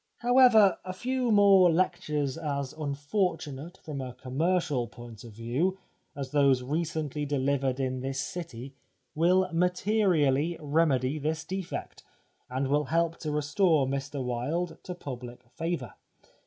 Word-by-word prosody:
However, 245 Hz, -5 st, +5 dB
a 185 Hz, -, -5 dB
few 250 Hz, +5 st, -1 dB
more 195 Hz, -4 st, +6 dB
lectures 155 Hz, -5 st, 0 dB
as 140 Hz, -4 st, -3 dB
unfortunate, 155 Hz, +1 st, -3 dB
from 145 Hz, -3 st, -5 dB
a 125 Hz, -1 st, -6 dB
commercial 150 Hz, -1 st, 0 dB
point 120 Hz, -1 st, -12 dB
of 115 Hz, -2 st, -11 dB
view, 125 Hz, -, -1 dB, 0.4 s
as 135 Hz, -2 st, -5 dB
those 140 Hz, -3 st, +3 dB
re 150 Hz, +6 st, 0 dB
cently 150 Hz, -3 st, -3 dB
delivered 135 Hz, -1 st, 0 dB
in 130 Hz, -1 st, -1 dB
this 135 Hz, +1 st, -3 dB
city 140 Hz, -6 st, -6 dB, 0.4 s
will 180 Hz, +4 st, +3 dB
materially 175 Hz, -4 st, +2 dB
remedy 150 Hz, -2 st, +1 dB
this 155 Hz, +2 st, -2 dB
defect, 190 Hz, -2 st, -5 dB, 0.5 s
and 130 Hz, +2 st, -1 dB
will 145 Hz, +2 st, +1 dB
help 165 Hz, +3 st, 0 dB
to 155 Hz, -, -4 dB
restore 150 Hz, +1 st, +2 dB
Mr 140 Hz, +1 st, -3 dB
Wilde 155 Hz, +8 st, -2 dB
to 180 Hz, -, -5 dB
public 125 Hz, -5 st, -8 dB
favour. 165 Hz, +4 st, -3 dB
150 Hz, 130 wpm, -28 LUFS, 135-175 Hz, 0.5 s, more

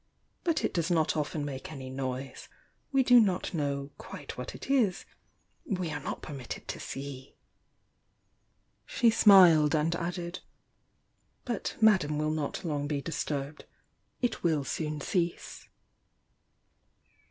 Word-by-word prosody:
"But 335 Hz, -2 st, +1 dB
it -, -, -1 dB
does 170 Hz, 0 st, 0 dB
not 160 Hz, -3 st, +2 dB
often 150 Hz, 0 st, -2 dB
make 135 Hz, 0 st, -6 dB
any 135 Hz, -4 st, -7 dB
noise. 130 Hz, 0 st, -5 dB, 0.4 s
We 270 Hz, -1 st, +4 dB
do 245 Hz, -1 st, +7 dB
not 190 Hz, -5 st, +1 dB
know 140 Hz, -3 st, -2 dB
quite -, -, -8 dB
what -, -, -6 dB
it -, -, -9 dB
is, 235 Hz, -9 st, +2 dB, 0.3 s
— -, -, -43 dB
we 185 Hz, -5 st, -2 dB
are 145 Hz, -, -3 dB
not 140 Hz, -, -5 dB
permitted 135 Hz, -5 st, -7 dB
to -, -, -4 dB
see!" 135 Hz, -1 st, -7 dB, 1.5 s
She 235 Hz, -2 st, +3 dB
smiled, 175 Hz, -9 st, +7 dB
and 160 Hz, +2 st, +1 dB
added: 175 Hz, +1 st, -4 dB, 1.1 s
"But 235 Hz, -4 st, -3 dB
Madame 190 Hz, -9 st, +4 dB
will 155 Hz, 0 st, 0 dB
not 155 Hz, +4 st, -3 dB
long 145 Hz, -3 st, -1 dB
be 145 Hz, -1 st, -1 dB
disturbed 145 Hz, -1 st, -4 dB, 0.3 s
— -, -, -45 dB
it 245 Hz, -, 0 dB
will 160 Hz, -4 st, +2 dB
soon 150 Hz, +1 st, -3 dB
cease." 170 Hz, +2 st, -2 dB
155 Hz, 135 wpm, -29 LUFS, 145-185 Hz, 1.5 s, do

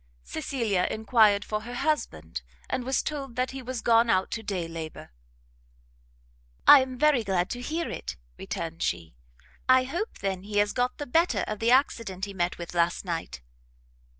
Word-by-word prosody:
Cecilia 200 Hz, -, -1 dB
enquired 215 Hz, -2 st, +3 dB
for 215 Hz, 0 st, -2 dB
her 240 Hz, +3 st, -7 dB
husband, 80 Hz, -, -2 dB, 0.3 s
and 260 Hz, -1 st, -1 dB
was 265 Hz, +1 st, 0 dB
told 275 Hz, -5 st, -4 dB
that 255 Hz, +1 st, 0 dB
he 265 Hz, 0 st, -6 dB
was 255 Hz, -2 st, -5 dB
gone 230 Hz, 0 st, +4 dB
out 190 Hz, -4 st, +2 dB
to 225 Hz, -, -3 dB
day 190 Hz, -5 st, -3 dB
labour. 165 Hz, -, -7 dB, 1.5 s
"I 290 Hz, -, +10 dB
am 260 Hz, -1 st, -4 dB
very 295 Hz, -4 st, +4 dB
glad 190 Hz, -2 st, 0 dB
to 245 Hz, -, -4 dB
hear 320 Hz, +6 st, -2 dB
it," 65 Hz, +2 st, -5 dB, 0.2 s
returned -, -, -5 dB
she; 80 Hz, -4 st, -2 dB, 0.6 s
"I 255 Hz, 0 st, +7 dB
hope 345 Hz, -, -4 dB
then 190 Hz, -2 st, -2 dB
he 205 Hz, +1 st, -4 dB
has 205 Hz, 0 st, +3 dB
got 250 Hz, 0 st, 0 dB
the 290 Hz, -, -4 dB
better 330 Hz, +7 st, +2 dB
of 215 Hz, -1 st, -4 dB
the 230 Hz, -, +1 dB
accident 230 Hz, -7 st, +2 dB
he 200 Hz, -, -8 dB
met 175 Hz, -1 st, -1 dB
with 170 Hz, 0 st, -7 dB
last 175 Hz, +2 st, +1 dB
night?" 165 Hz, -, -4 dB
220 Hz, 175 wpm, -27 LUFS, 185-255 Hz, 1.5 s, I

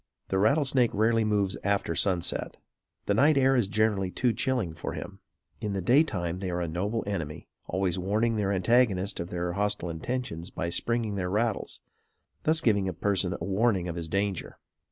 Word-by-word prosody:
The 95 Hz, -, +1 dB
rattlesnake 135 Hz, +1 st, +3 dB
rarely 110 Hz, +2 st, +3 dB
moves 100 Hz, -3 st, 0 dB
after 100 Hz, -4 st, 0 dB
sunset. 90 Hz, 0 st, 0 dB, 0.5 s
The 100 Hz, -, +2 dB
night 140 Hz, +7 st, +4 dB
air 135 Hz, 0 st, +4 dB
is 120 Hz, -6 st, +2 dB
generally 105 Hz, -2 st, +1 dB
too 120 Hz, +5 st, +1 dB
chilling 120 Hz, -7 st, 0 dB
for -, -, -5 dB
him. -, -, -7 dB, 0.4 s
In 105 Hz, -2 st, -3 dB
the 100 Hz, -, -1 dB
day 125 Hz, -, +5 dB
time 90 Hz, -, -2 dB
they 95 Hz, -1 st, -3 dB
are 90 Hz, 0 st, -2 dB
a 85 Hz, -, -1 dB
noble 100 Hz, +8 st, -2 dB
enemy, 80 Hz, -7 st, -4 dB, 0.2 s
always 95 Hz, 0 st, 0 dB
warning 110 Hz, +5 st, +1 dB
their 100 Hz, -2 st, 0 dB
antagonist 100 Hz, -1 st, +2 dB
of 85 Hz, -, -4 dB
their 90 Hz, -1 st, -2 dB
hostile 100 Hz, -3 st, -1 dB
intentions 85 Hz, -1 st, -4 dB
by 85 Hz, -, -3 dB
springing 110 Hz, +3 st, -1 dB
their 90 Hz, -1 st, -2 dB
rattles, 110 Hz, +2 st, -1 dB, 0.6 s
thus 155 Hz, +1 st, +3 dB
giving 100 Hz, -4 st, +2 dB
a -, -, -4 dB
person 95 Hz, +1 st, 0 dB
warning 95 Hz, +1 st, +1 dB
of 85 Hz, -, -4 dB
his 85 Hz, -2 st, -4 dB
danger. 100 Hz, 0 st, -2 dB
100 Hz, 175 wpm, -28 LUFS, 90-115 Hz, 0.6 s, day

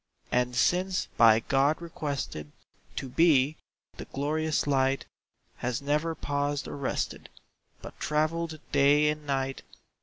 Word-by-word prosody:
And 125 Hz, 0 st, +1 dB
since 180 Hz, +9 st, +1 dB
by 115 Hz, -1 st, +6 dB
God 140 Hz, +5 st, +2 dB
requested 140 Hz, -, -5 dB, 0.4 s
To 135 Hz, -, -4 dB
be, 150 Hz, 0 st, +3 dB, 0.4 s
the -, -, -7 dB
glorious 155 Hz, +2 st, -1 dB
light 135 Hz, -1 st, +1 dB, 0.5 s
Has 120 Hz, 0 st, -2 dB
never 150 Hz, +3 st, 0 dB
paused 145 Hz, -1 st, -2 dB
or -, -, -6 dB
rested, 140 Hz, -2 st, -3 dB, 0.5 s
But -, -, -10 dB
travelled 155 Hz, +1 st, -1 dB
day 145 Hz, +2 st, +4 dB
and 150 Hz, -1 st, -4 dB
night. 135 Hz, -1 st, -1 dB
145 Hz, 120 wpm, -28 LUFS, 135-155 Hz, 0.5 s, by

